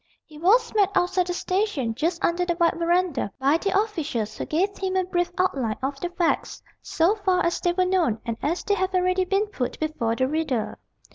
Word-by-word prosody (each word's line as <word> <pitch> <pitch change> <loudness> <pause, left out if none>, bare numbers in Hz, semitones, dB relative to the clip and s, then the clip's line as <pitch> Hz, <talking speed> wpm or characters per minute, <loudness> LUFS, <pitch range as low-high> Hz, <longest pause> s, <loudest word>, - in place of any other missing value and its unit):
He 300 -1 -14
was 400 +9 +3
met 410 -3 +3
outside 365 0 +2
the 355 - -1
station, 365 - -1
just 335 +8 -1
under 345 +1 +1
the 345 -1 -1
wide 335 -1 +4
verandah, 340 - +1
by 275 +4 +3
the 395 +1 +1
officials, 290 - -2
who - - -5
gave 385 +6 0
him 380 -1 -2
a 375 - +2
brief 350 -1 -1
outline 265 -12 0
of 275 +1 -2
the 350 - -3
facts, 345 -1 -1 0.2
so 335 +5 +2
far 375 -3 +1
as 340 - 0
they 350 - +1
were 365 +1 +2
known, 355 - +1
and 230 -2 -2
as 335 +5 -1
they 410 - +1
have 375 -1 -1
already 365 +1 +2
been 390 +3 +1
put 335 - -4
before 300 -8 -1
the 260 +2 +1
reader. 295 -6 -2
350 Hz, 210 wpm, -24 LUFS, 295-370 Hz, 0.2 s, wide